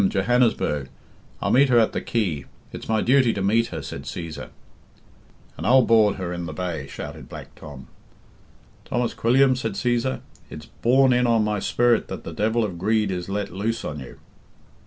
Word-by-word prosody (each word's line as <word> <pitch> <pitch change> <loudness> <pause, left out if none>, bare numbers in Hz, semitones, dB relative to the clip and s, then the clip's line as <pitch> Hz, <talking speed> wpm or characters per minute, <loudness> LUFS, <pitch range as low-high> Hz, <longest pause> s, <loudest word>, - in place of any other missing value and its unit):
Johannesburg. 100 - +1 0.5
I'll - - +1
meet 135 +3 +5
her 120 - +4
at 115 -2 +3
the - - -2
quay 90 - -2 0.3
it's - - -8
my 110 -1 +2
duty 125 -1 +3
to 100 - -3
meet 115 +4 +2
her," 80 -4 -6
said - - -7
Cæsar. 85 -2 -6 1.1
"And - - -4
I'll 130 +2 +6
board 110 -3 +4
her 90 -2 -4
in 85 -1 -5
the 80 - -6
bay," 80 -4 -4
shouted - - -8
Black - - -10
Tom. 70 -4 -11 1.0
"Thomas 120 -1 -2
Quilliam," 130 +3 +3
said 115 -4 -3
Cæsar, 120 +4 -1 0.3
"it's 75 0 -9
borne 130 - +3
in 125 0 +2
on 115 -2 +3
my 105 -1 -1
spirit 120 +4 +2
that - - -7
the - - -7
devil 110 +2 +1
of 95 -5 -4
greed 105 +1 +1
is 90 0 -4
let 100 +1 -3
loose 110 +4 -2
on 75 -1 -5
you." 65 -3 -10
110 Hz, 180 wpm, -23 LUFS, 90-120 Hz, 1.1 s, I'll